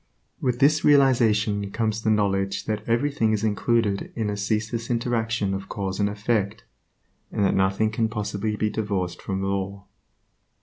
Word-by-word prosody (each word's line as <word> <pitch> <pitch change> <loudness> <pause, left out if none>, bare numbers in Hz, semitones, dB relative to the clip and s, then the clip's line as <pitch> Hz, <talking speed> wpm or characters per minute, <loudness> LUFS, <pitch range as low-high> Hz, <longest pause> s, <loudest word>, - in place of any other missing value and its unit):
With 125 -2 0
this 150 +4 +4
realization 110 -8 +3
comes 110 +1 -1
the 110 - 0
knowledge 100 -2 +1
that 105 -1 -2
everything 115 -2 +1
is 110 0 -1
included 110 -1 0
in 110 -3 -1
a - - -2
ceaseless 110 +3 -2
interaction 115 -4 0
of 95 0 -5
cause 95 -1 -3
and 100 0 +2
effect, 105 0 -1 0.7
and 100 - +1
that - - +2
nothing 95 +3 +2
can 110 0 0
possibly 105 -1 -2
be 105 0 0
divorced 100 -5 -2
from 95 -1 -3
law. 100 0 -3
105 Hz, 150 wpm, -24 LUFS, 100-115 Hz, 0.7 s, this